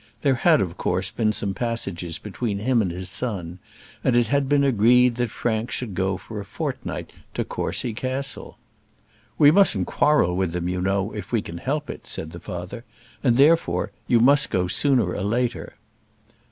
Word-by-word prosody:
There 140 -2 +4
had, 155 +5 +4
of 90 -2 -3
course, 90 +1 -1
been 110 -2 +1
some 100 -2 -1
passages 95 -8 -3
between 105 0 -4
him 120 +3 +2
and 95 - 0
his 90 +2 -5
son, 95 -5 -3 0.4
and 130 - +2
it 120 -1 +4
had 140 0 0
been 145 -1 +3
agreed 125 0 +4
that 120 -1 0
Frank 110 +1 -2
should 120 -6 -4
go 95 +1 -1
for 110 +1 -8
a - - -5
fortnight 100 - -5 0.2
to - - -1
Courcy 120 - -2
Castle. 130 +4 -3 0.8
"We 145 -1 +7
mustn't 155 - +4
quarrel 145 -11 +2
with 90 -2 -1
them, 90 0 -2
you 90 0 -2
know, 100 +2 0
if 105 -1 -7
we 115 -3 +1
can 85 +1 -7
help 145 - -2
it," - - -8
said 80 - -3
the 85 - -9
father; 90 +6 -7 0.4
"and, 120 -4 +3
therefore, 155 +6 +3 0.2
you 120 - +4
must 140 +4 +4
go 90 -1 +1
sooner 125 +8 +1
or - - -4
later." 120 +4 -2
110 Hz, 180 wpm, -23 LUFS, 95-130 Hz, 0.8 s, We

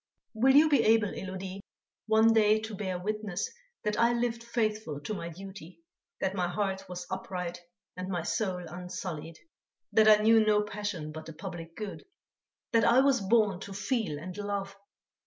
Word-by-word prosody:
"Will 260 +5 +4
you 305 +2 +8
be 295 -2 +4
able, 220 -2 +4
Élodie, 190 +1 -6 0.5
one 220 +1 +5
day 215 -1 +5
to 220 0 -6
bear 190 -2 -3
witness 210 - -3 0.3
that 210 0 -1
I 235 +1 +4
lived 235 -1 -1
faithful 215 - -1
to 150 - -4
my 170 -4 -5
duty, 180 -1 -11 0.4
that 190 - 0
my 180 -2 0
heart 195 0 -2
was 180 0 -6
upright 180 -2 -4 0.3
and 185 +1 -5
my 175 -3 -2
soul 185 -2 -1
unsullied, 175 -2 -6 0.6
that 215 -1 +6
I 210 -1 +7
knew 225 0 +6
no 210 -1 +3
passion 205 -7 -4
but 155 0 -8
the 160 - -8
public 165 -1 -8
good; 210 -2 -6 0.7
that 230 -2 +4
I 255 - +6
was 270 -4 +3
born 205 -2 +3
to 200 0 -8
feel 210 - -1
and 180 +4 -7
love? 200 -1 -3
195 Hz, 170 wpm, -30 LUFS, 180-220 Hz, 0.7 s, you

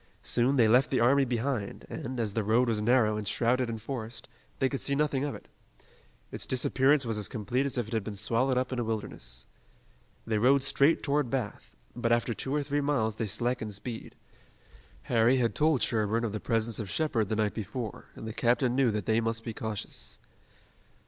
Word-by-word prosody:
Soon 125 +3 +2
they 120 -4 +5
left 125 +5 +4
the 130 - +1
army 135 +4 +4
behind, 120 -3 -2
and, 125 +1 -5
as 110 -3 -1
the 110 - 0
road 115 +4 +3
was 110 -2 0
narrow 110 -2 +3
and 105 -1 -3
shrouded 125 +3 +1
in 115 - -3
forest, 115 0 -6 0.3
they 135 - +2
could 135 0 -2
see 140 - +1
nothing 140 -2 +1
of 145 - -2
it. - - -12 0.8
Its - - -2
disappearance 135 +2 +3
was 115 -2 -2
as 105 - -1
complete 125 +4 -1
as 135 - -1
if 120 - 0
it 115 - -8
had 110 -3 0
been 105 0 -6
swallowed 120 +5 +1
up 130 +1 0
in 125 - -2
a - - 0
wilderness. 65 - -3 0.8
They 110 -2 0
rode 130 +4 +4
straight 140 +3 +3
toward 145 -3 +1
Bath, 125 -5 -4 0.2
but 120 -1 -1
after 120 0 +2
two 130 - -5
or 150 - +1
three 145 +1 -1
miles 115 -7 0
they 115 - -2
slackened 110 0 -2
speed. 115 +3 -7 0.9
Harry 120 +2 +3
had 120 -2 +1
told 155 -3 +2
Sherburne 110 0 +1
of 115 - -1
the 110 - -2
presence 115 0 0
of 105 -4 -4
Shepard 120 - 0
the 110 - 0
night 105 -1 0
before, 110 0 -5
and - - -8
the 110 - -5
captain 120 +1 +2
knew 135 -2 +3
that 105 -3 -2
they 110 +1 +2
must 115 0 -2
be 115 - -5
cautious. 110 -2 -5
120 Hz, 205 wpm, -29 LUFS, 110-130 Hz, 0.9 s, they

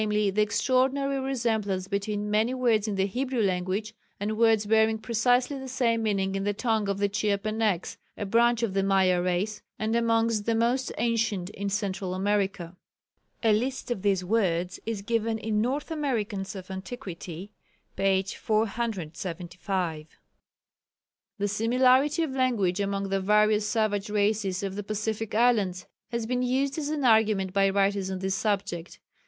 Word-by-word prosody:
_, 210 -2 +1
the 210 - +2
extraordinary 265 +5 +1
resemblance 220 -8 -1
between 205 +1 -2
many 220 +4 +2
words 230 -4 +2
in 210 - -1
the 195 0 +1
Hebrew 250 +3 -1
language 190 +3 -1 0.3
and 210 +2 -2
words 225 -2 +3
bearing 220 +1 +3
precisely 245 +5 +1
the 265 - -7
same 240 -3 +1
meaning 195 -3 0
in 195 0 -2
the 205 0 -1
tongue 220 -3 0
of 200 - 0
the 200 0 +2
Chiapenecs 210 -1 -1 0.2
a 205 - -3
branch 235 +3 +3
of 215 -5 0
the 195 - +2
Maya 190 -2 +3
race, 185 +4 -1 0.2
and 220 +1 -1
amongst 230 -2 +1
the 230 - +2
most 240 +3 +1
ancient 220 -5 0
in 200 0 -4
Central 195 -2 -2
America. 195 -3 -1 0.7
A 220 -2 +5
list 250 +4 -1
of 235 - -2
these 195 -2 +1
words 180 -4 0
is 220 -3 -3
given 225 0 0
in 215 -1 -1
North 275 +7 -2
Americans 215 -10 -2
of 190 0 -8
Antiquity, 190 -2 -7 0.4
p. 195 -1 +2
475. 185 -5 -3 1.3
The 205 0 0
similarity 255 - +3
of 310 - -2
language 235 -8 +1
among 200 0 -1
the 195 0 0
various 210 +1 +3
savages 210 -3 0
races 205 -2 0
of 195 -1 -3
the 205 - -3
Pacific 215 +1 -3
islands 210 -6 +2 0.2
has 235 -1 -2
been 250 +2 -1
used 270 +4 0
as 295 -1 -3
an 300 -3 -1
argument 215 -5 +3
by 195 -1 +3
writers 195 0 +1
on 190 - -3
this 190 +1 -2
subject. 195 -4 -2
210 Hz, 155 wpm, -27 LUFS, 195-230 Hz, 1.3 s, A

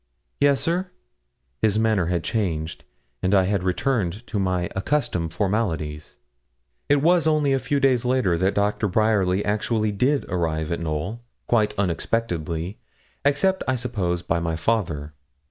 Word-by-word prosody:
'Yes, 140 -1 +4
sir.' 180 +3 -1 0.7
His 110 -1 +3
manner 110 -6 +2
had 85 -2 -1
changed, 80 -8 -2 0.4
and 95 +2 +2
I 95 - +5
had 100 0 0
returned 95 +2 -1
to 110 -2 -3
my 90 -2 0
accustomed 95 - -1
formalities. 80 -7 -2 0.7
It 145 0 +3
was 170 -1 +4
only 150 -3 +3
a 135 - +2
few 140 +3 0
days 130 -3 +3
later 125 -8 +2
that 95 +4 +1
Dr. 105 +1 +1
Bryerly 100 -2 +2
actually 110 +1 0
did 130 +8 +1
arrive 80 -3 -1
at 85 - -1
Knowl, 85 +8 -3 0.2
quite 110 -3 +2
unexpectedly, 90 -2 -2 0.4
except, 145 +7 +2
I 130 - +2
suppose, 100 -8 -2
by 85 0 0
my 85 -1 -1
father. 80 -6 -1
100 Hz, 145 wpm, -24 LUFS, 85-125 Hz, 0.7 s, I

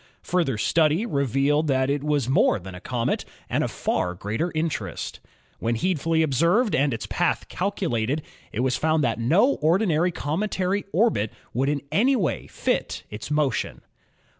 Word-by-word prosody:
Further 165 -9 0
study 160 - +2
revealed 140 - +1
that 130 -2 +2
it 145 0 -1
was 145 -4 +1
more 130 - +3
than 95 -1 -9
a 90 - -9
comet 120 0 -1 0.2
and - - 0
of - - -1
far 90 0 -1
greater 110 - -2
interest. 155 - -3 0.4
When 115 +1 0
needfully 160 +3 +1
ob 145 -3 -1
served 180 - +3
and 140 +1 +2
its 115 - -3
path - - 0
calculated, 155 - -1 0.3
it 115 - -2
was 125 -1 +1
found 155 -1 +2
that 115 -2 0
no 180 - +3
ordi 175 +8 +3
nary 170 +2 +2
cometary 185 +5 -1
orbit 195 - +2 0.2
would 135 +4 +1
in 145 -1 -1
any 260 +7 +3
way 185 - -1
fit - - -2
its 105 +5 -7
motion. 150 -5 0
150 Hz, 165 wpm, -25 LUFS, 125-175 Hz, 0.4 s, more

